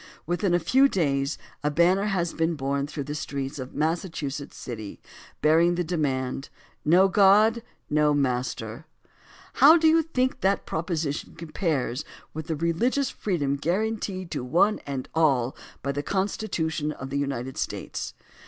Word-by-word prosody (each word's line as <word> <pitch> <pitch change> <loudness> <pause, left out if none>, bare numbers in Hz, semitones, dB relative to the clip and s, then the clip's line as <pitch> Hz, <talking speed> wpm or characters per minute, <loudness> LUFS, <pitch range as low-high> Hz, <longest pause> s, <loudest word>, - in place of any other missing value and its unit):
Within 175 +2 +1
a - - +3
few 265 - +4
days 140 - 0 0.3
a 150 - +2
banner 175 +6 +3
has 180 -5 0
been 165 +1 0
borne 140 0 -1
through 145 -1 -5
the 145 +2 -5
streets 140 -1 -4
of 130 0 -6
a - - -11
Massachusetts 155 -3 -2
city 110 -5 -7 0.4
bearing 165 +3 +4
the 175 - 0
demand: 135 -6 -2 0.3
"No 180 +5 +5
God 210 +4 +5 0.2
— - - -44
No 150 0 +4
Master." 125 -1 -2 0.7
How 315 +4 +9
do 320 -1 +3
you 325 +1 +5
think 260 -5 -1
that 195 +1 +1
proposition 160 -3 -3
compares 155 -6 -2 0.3
with 155 0 -6
the 160 - -1
religious 200 - 0
freedom 145 -8 -1
guaranteed 185 +2 -2
to - - -3
one 175 +11 +3
and 135 -2 -4
all 135 -6 +2 0.3
by 140 - 0
the 145 +1 -2
Constitution 165 -4 -1
of 135 -2 -8
the 140 - 0
United 130 -2 -3
States? - - -4
160 Hz, 155 wpm, -26 LUFS, 140-190 Hz, 0.7 s, How